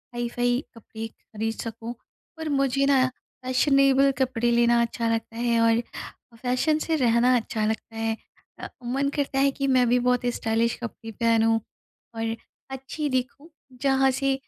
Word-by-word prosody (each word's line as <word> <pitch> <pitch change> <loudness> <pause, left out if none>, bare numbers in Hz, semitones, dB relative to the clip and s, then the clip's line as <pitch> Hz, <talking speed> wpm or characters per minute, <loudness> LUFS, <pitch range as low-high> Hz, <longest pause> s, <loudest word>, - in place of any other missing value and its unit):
Hi-fi 245 +2 0
कपड़े 225 0 -7
ख़रीद 225 0 -5
सकूँ 230 +1 -6 0.5
और 320 - -3
मुझे 275 -1 +2
न 260 -2 +5 0.4
फैशनेबल 275 +1 +4
कपड़े 250 -3 +1
लेना 235 0 +4
अच्छा 235 0 -1
लगता 225 0 -4
है 235 -1 +1
और 230 0 +4 0.6
फ़ैशन 255 +6 +1
से 320 0 0
रहना 245 -1 +3
अच्छा 225 -2 -1
लगता 220 +1 -3
है। 225 0 -1 0.4
अ, - - -5 0.2
मन 275 +3 0
करता 280 -2 -1
है 275 0 +4
कि 275 0 -2
मैं 255 -2 +4
भी 245 +1 +4
बहुत 250 0 +1
स्टाइलिश 225 +1 0
कपड़े 225 -1 -7
पहनूँ 225 0 +2 0.6
और 225 0 -2 0.4
अच्छी 270 +3 -4
दिखूँ। 265 +4 -3 0.3
जहाँ 270 -1 +3
से 275 +1 0
245 Hz, 150 wpm, -25 LUFS, 230-270 Hz, 0.6 s, न